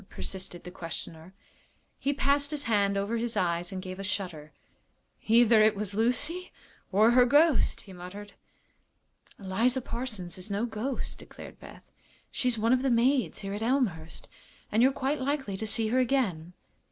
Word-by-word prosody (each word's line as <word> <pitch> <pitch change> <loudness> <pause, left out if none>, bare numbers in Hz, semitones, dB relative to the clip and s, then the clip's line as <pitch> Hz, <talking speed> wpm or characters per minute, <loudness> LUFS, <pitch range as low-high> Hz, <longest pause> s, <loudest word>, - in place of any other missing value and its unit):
persisted 185 -2 -6
the 180 - -8
questioner. 165 -1 -7 0.7
He 280 - 0
passed 280 0 +1
his 295 -1 -2
hand 200 -4 +2
over 205 +4 -1
his 230 0 -2
eyes 175 +1 0
and 185 -1 -5
gave 185 0 -7
a - - -4
shudder. 180 -6 -4 0.8
"Either 230 0 +6
it 215 0 +5
was 205 -1 -3
Lucy 270 - 0 0.4
or 215 +4 +5
her 250 +1 +6
ghost," 290 +3 +3
he 195 - -13
muttered. 195 +3 -9 1.0
"Eliza 225 +7 +1
Parsons 215 -8 -5
is 185 +4 -5
no 205 +3 0
ghost," 240 +3 -4
declared - - -12
Beth. - - -13 0.5
"She's 250 -2 0
one 225 +3 +3
of 255 - +2
the 270 - +1
maids 250 +2 +2
here 195 - -3
at 205 - -4
Elmhurst, 220 - -1 0.4
and 220 - +3
you're 260 +2 +6
quite 270 +2 -2
likely 265 -7 -1
to 220 +3 -4
see 220 +1 +1
her 250 +3 +2
again." 210 -11 0
220 Hz, 165 wpm, -29 LUFS, 190-255 Hz, 1.0 s, Either